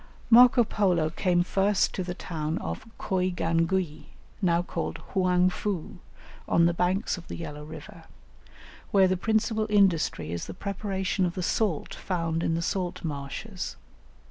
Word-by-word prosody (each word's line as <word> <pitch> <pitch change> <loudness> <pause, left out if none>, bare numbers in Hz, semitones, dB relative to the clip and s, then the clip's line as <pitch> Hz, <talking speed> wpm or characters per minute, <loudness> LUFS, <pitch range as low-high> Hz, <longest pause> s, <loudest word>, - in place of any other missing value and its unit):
Marco 245 +1 +8
Polo 180 -7 +1
came 175 0 +2
first 195 +2 +1
to 185 - -2
the 180 0 -5
town 160 -3 -3
of - - -5
Coigangui, 175 -2 0 0.4
now 175 -2 +2
called - - -4 0.2
Hoang 185 -1 +3
fou, 190 -4 -4 0.5
on 170 - +4
the 170 - +3
banks 180 +2 0
of 170 - -15
the - - -6
Yellow 150 -3 -7
River, 155 - -11 0.8
where 195 -2 +5
the 185 - +1
principal 220 +2 0
industry 180 - +2
is 85 0 -4
the - - -7
preparation 195 -1 -2
of 175 -1 0
the 185 - -3
salt 195 -4 0
found 165 -3 -2
in 165 - 0
the 170 - -1
salt 180 0 -2
marshes. 160 +7 -5
180 Hz, 145 wpm, -27 LUFS, 165-195 Hz, 0.8 s, Marco